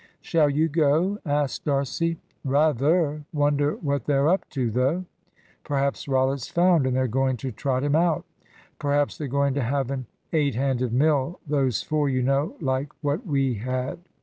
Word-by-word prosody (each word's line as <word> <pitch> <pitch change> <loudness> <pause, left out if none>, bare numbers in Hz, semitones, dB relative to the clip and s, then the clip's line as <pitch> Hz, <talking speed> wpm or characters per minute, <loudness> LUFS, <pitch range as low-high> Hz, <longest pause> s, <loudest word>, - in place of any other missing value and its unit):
"Shall 155 -3 +2
you 155 +3 +2
go?" 165 +6 +2
asked 145 -1 -1
D'Arcy. 150 +4 0 0.3
"Rather! 150 +2 +2
Wonder 145 -1 +1
what 140 -2 -2
they're 140 0 +2
up 185 +4 +1
to, 125 -5 -1
though?" 135 - 0 0.6
"Perhaps 140 -2 -1
Rollitt's 135 -1 +1
found, 170 -5 +3
and 130 - 0
they're 130 0 +2
going 130 +2 0
to 130 +3 -4
trot 130 +3 -1
him 145 0 +2
out." 170 +1 +2 0.5
"Perhaps 145 0 0
they're 150 - -3
going 140 +1 +1
to 140 - -1
have 135 +2 -1
an 130 -3 -4 0.3
eight 145 -5 +2
handed 130 -2 0
mill, 145 +4 +1
those 135 -7 0
four 150 -2 0
you 130 -1 0
know 140 +4 +1
like 135 -1 -1
what 145 - -1
we 135 -4 +1
had." 130 +6 -3
140 Hz, 165 wpm, -25 LUFS, 130-150 Hz, 0.6 s, found